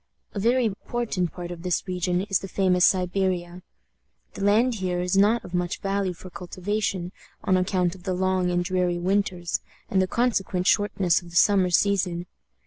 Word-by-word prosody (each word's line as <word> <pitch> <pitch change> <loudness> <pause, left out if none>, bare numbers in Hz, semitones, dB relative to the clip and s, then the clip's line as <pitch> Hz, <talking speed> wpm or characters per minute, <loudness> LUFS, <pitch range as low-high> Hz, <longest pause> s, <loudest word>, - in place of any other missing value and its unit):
A 205 - -3
very 240 +4 +2
important 215 -3 -2
part 175 -1 -7
of 170 -1 -7
this 180 -1 -1
region 180 0 0
is 195 -1 0
the 195 - -7
famous 185 -2 +3
Siberia. 180 -1 -1 0.7
The - - -5
land 225 +5 +3
here 180 -1 -1
is 180 +1 0
not 210 +4 +3
of 175 - -11
much 175 -1 -1
value 195 -1 -1
for 185 +2 -12
cultivation, 185 0 -3 0.3
on 185 - +2
account 185 -1 +1
of 190 - -13
the 185 0 -2
long 185 0 +1
and 175 0 0
dreary 180 -1 0
winters 180 -1 0 0.3
and 190 - +3
the 185 - +1
consequent 195 -5 0
shortness 195 -4 +2
of 175 - -13
the 170 - -13
summer 190 0 +4
season. 180 -2 +1
185 Hz, 175 wpm, -25 LUFS, 180-200 Hz, 0.7 s, summer